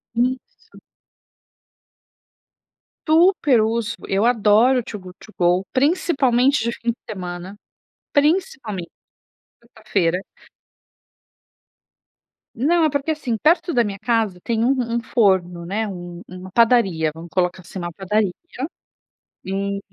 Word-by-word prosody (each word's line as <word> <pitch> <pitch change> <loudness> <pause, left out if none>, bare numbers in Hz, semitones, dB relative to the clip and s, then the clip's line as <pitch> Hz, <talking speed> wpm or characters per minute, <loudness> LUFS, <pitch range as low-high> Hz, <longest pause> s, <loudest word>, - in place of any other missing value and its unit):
Isso. 250 +2 -3 2.3
Super 315 - +4
uso. 225 +1 -1
Eu 195 +3 +1
adoro 235 +2 +4
o - - -4
Too 210 -2 -7
Good 185 -1 -13
To 215 - -17
Go, 180 +2 +2
principalmente 275 -3 +2
de 235 - 0
fim 235 0 -4
de 235 - -11
semana. 180 -1 -6 0.6
Principalmente 285 - 0 0.7
na 235 - -24
sexta-feira. 190 -6 -1 2.3
Não. 320 +8 +2
É 310 - +4
porque, 285 +2 -1
assim, 255 -7 -2
perto 335 - +2
da 240 - +4
minha 200 -3 -5
casa 225 -6 0
tem 230 -1 0
um 250 - +3 0.2
um 235 - 0
forno, 190 -8 +1
né. 210 +5 -2
Um 175 -2 -8
uma 185 +1 -10
padaria, 195 -9 +3
vamos 165 +2 -10
colocar 180 0 0
assim. 185 +2 -9
Uma 175 -1 -4
padaria 195 +1 0 1.1
e 200 +1 -2
220 Hz, 120 wpm, -21 LUFS, 185-255 Hz, 2.3 s, Super